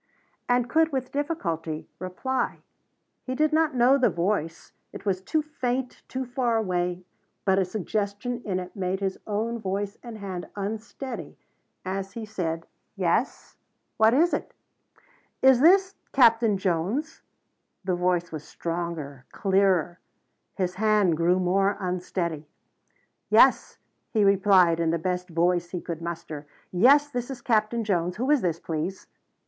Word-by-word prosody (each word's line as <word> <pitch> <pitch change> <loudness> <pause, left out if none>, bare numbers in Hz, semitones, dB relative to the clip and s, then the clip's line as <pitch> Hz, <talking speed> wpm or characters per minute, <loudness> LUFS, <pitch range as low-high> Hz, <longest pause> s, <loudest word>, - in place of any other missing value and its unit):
And 245 0 +3
could 320 +5 +3
with 260 -2 -3
difficulty 170 - -3
reply. 185 +9 -3 0.6
He 255 - -4
did 310 +2 +2
not 315 -3 +2
know 255 +3 +5
the 255 - +4
voice, 170 -2 -2 0.2
it - - -10
was 190 -2 0
too 305 +10 0
faint, 260 -4 -3
too 260 0 -4
far 245 -2 0
away, 180 -3 -1 0.4
but 190 0 +3
a 190 - +2
suggestion 210 +5 -3
in 185 -3 -1
it 180 +2 -8
made 190 -1 -2
his 195 -1 -2
own 225 +3 -1
voice 200 0 -3
and 235 -3 -8
hand 190 -4 -6
unsteady 220 +5 -5 0.5
as 195 +1 -4
he 230 -2 -6
said: 165 -6 -3 0.3
"Yes? - - -1 0.4
What 220 +2 +5
is 340 +5 +3
it?" - - -3 0.9
"Is 265 -2 +7
this 380 +4 +5 0.2
Captain 230 -5 +5
Jones?" 190 - -1 0.6
The 185 -1 0
voice 175 -1 0
was 155 -2 -6
stronger, 165 -6 -5
clearer. 190 -3 +2 0.6
His 180 -2 -1
hand 210 -6 +3
grew 170 +3 +2
more 195 +2 +2
unsteady. 175 -4 -3 0.8
"Yes," - - +5 0.3
he 215 -3 +2
replied 190 -4 +5
in 165 -1 +1
the 165 - +1
best 180 +2 -2
voice 175 +1 +1
he 180 - -4
could 170 -1 -6
muster. 165 -3 -6 0.2
"Yes 275 +11 +5
this 245 -1 -3
is 255 -3 -7
Captain 225 0 +1
Jones. 180 -4 0
Who 255 +6 0
is 295 -4 +3
it, 170 -2 -1
please?" 165 +4 -3
195 Hz, 140 wpm, -26 LUFS, 175-240 Hz, 0.9 s, Is